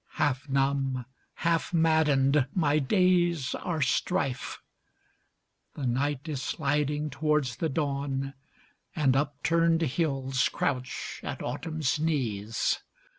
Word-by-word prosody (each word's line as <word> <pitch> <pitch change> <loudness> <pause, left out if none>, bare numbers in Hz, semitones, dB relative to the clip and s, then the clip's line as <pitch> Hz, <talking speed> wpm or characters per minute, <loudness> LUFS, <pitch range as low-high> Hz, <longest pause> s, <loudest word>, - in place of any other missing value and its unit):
Half 140 0 0
numb, 135 -2 +1 0.4
half 170 +1 +1
maddened, 150 -4 +3
my 155 -4 +3
days 175 -3 +2
are 160 -5 -1
strife. 135 -1 -1 1.2
The 140 - -4
night 140 +4 -1
is 145 -4 -3
sliding 150 +1 -1
towards 140 -4 0
the 160 +4 -1
dawn, 140 -2 -2 0.6
And 135 -5 +3
upturned 165 +4 +2
hills 135 -4 0
crouch 125 -2 -3
at - - -5
autumn's 155 -3 -2
knees. 115 - 0
145 Hz, 100 wpm, -28 LUFS, 135-160 Hz, 1.2 s, maddened